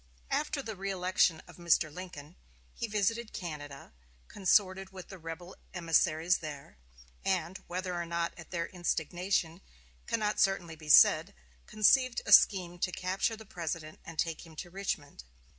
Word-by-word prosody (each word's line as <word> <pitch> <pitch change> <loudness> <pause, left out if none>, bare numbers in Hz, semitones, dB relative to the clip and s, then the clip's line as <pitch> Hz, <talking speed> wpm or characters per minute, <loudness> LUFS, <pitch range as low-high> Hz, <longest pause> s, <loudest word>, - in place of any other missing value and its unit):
After - - -1
the 220 - -5
reëlection 185 -3 +1
of - - -14
Mr. 170 -3 +2
Lincoln, 175 -3 -9 0.4
he 230 - -4
visited 215 +2 -1
Canada, 145 - -7 0.4
consorted 190 0 +2
with 185 -2 -10
the 190 - -10
rebel 165 +2 -8 0.2
emissaries 165 0 +2
there, 145 - -9 0.4
and 185 -1 -1
whether 180 +1 -3
or 175 -1 -3
not 170 0 -1
at 170 - -12
their 170 -2 -2
instigation 175 0 -1 0.5
cannot 215 -2 0
certainly 175 -4 +1
be 155 -1 -11
said - - +7 0.3
conceived 255 +3 +3
a - - -3
scheme 175 -3 +6
to 180 - 0
capture 185 +5 -1
the 220 0 -12
President 165 -4 -5
and 165 -1 -10
take 165 -1 -1
him 165 -2 -14
to 175 +2 -8
Richmond. 160 - -4
175 Hz, 145 wpm, -31 LUFS, 165-195 Hz, 0.5 s, said